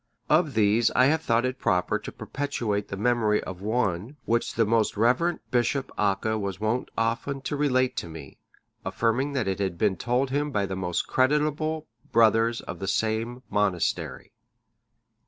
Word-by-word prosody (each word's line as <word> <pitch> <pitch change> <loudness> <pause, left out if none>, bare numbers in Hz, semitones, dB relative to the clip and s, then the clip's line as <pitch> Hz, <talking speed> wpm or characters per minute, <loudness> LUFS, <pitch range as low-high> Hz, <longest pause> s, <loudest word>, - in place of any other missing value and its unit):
Of 155 -4 +3
these 110 +2 +4
I 125 - +6
have 155 +3 +3
thought 115 -3 +1
it 130 0 -3
proper 90 0 +1
to - - -8
perpetuate 115 -8 -3
the 100 - -5
memory 110 -1 +2
of 95 -1 -7
one 110 - -1
which 115 +1 0
the 115 - +3
most 110 -1 +1
reverend 125 +10 +2
Bishop 125 +2 0
Acca(626) 105 +2 0
was 95 -2 -4
wont 110 +4 -1
often 115 +5 -1
to 140 +2 -3
relate 130 -3 +1
to 85 - -3
me, 80 -4 -10 0.4
affirming 125 +5 0
that 130 -7 -1
it 95 +1 -1
had 95 -4 -1
been 100 0 +1
told 125 +2 0
him 145 +2 0
by 105 -7 0
most 95 -2 -2
creditable 150 +3 +1 0.3
brothers 115 0 +4
of 85 - -7
the 95 - -4
same 110 +5 -1
monastery. 100 -4 -1
115 Hz, 160 wpm, -26 LUFS, 105-130 Hz, 0.4 s, I